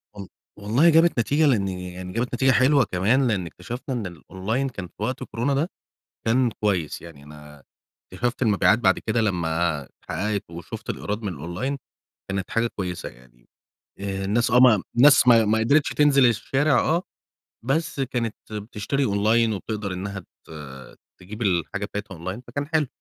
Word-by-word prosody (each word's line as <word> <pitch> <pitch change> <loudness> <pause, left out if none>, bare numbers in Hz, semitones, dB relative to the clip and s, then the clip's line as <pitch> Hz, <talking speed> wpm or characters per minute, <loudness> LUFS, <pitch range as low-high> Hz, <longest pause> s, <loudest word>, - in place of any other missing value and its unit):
و 100 -2 -8 0.3
والله 120 +12 +3
جابت 165 -3 +4
نتيجة 145 +7 +2
لإن، 110 -8 +2
يعني 90 0 -6
جابت 120 +2 -2
نتيجة 130 +2 +3
حلوة 135 +2 +4
كمان 115 +9 +2
لإن 95 -6 0
اكتشفنا 120 - -6
إن 110 -5 -3
الأونلاين 95 +9 -3
كان 95 -8 -7
في - - -31
وقت 130 +3 -2
كورونا 125 +5 -2
ده 150 +6 0 0.6
كان 120 +2 +3
كويس، 100 -7 -2
يعني 80 -4 -12
أنا 75 -1 -13 0.5
اكتشَفت 120 +6 -2
المبيعات 105 0 +4
بعد 95 -5 +3
كده 115 +1 -1
لمّا 85 -6 0
اتحقَّقِت، 105 +9 -4
وشُفت 85 0 -7
الإيراد 105 +2 -4
من 105 - -2
الأونلاين 90 - -4 0.5
كانت 95 -2 -3
حاجة 115 +1 +1
كويسة 90 -3 -4
يعني - - -21 0.5
آآ، 95 -1 -3
الناس 115 +4 +1
آه 125 - +6
م 120 -6 +6
الناس 135 0 +7
ما 115 -2 +8
ما 110 - +2
ما 110 +1 +2
قدِرتش 140 +6 +3
تنزِل 140 -3 +4
الشارع 135 +6 +2
آه، 170 +3 +1 0.6
بس 160 +3 -1
كانت 120 -4 -2 0.2
بتشتري 105 +5 -3
أونلاين 110 +3 +2
وبتقدَر 105 0 -4
إنها 100 +2 -5
ت 85 - -19 0.7
تجيب 105 +5 -10
الحاجة 95 +1 0
بتاعتها 105 -2 -6
أونلاين 95 +8 -5
فكان 140 +4 -4
حلو. 155 -3 +1
110 Hz, 160 wpm, -24 LUFS, 95-130 Hz, 0.7 s, ما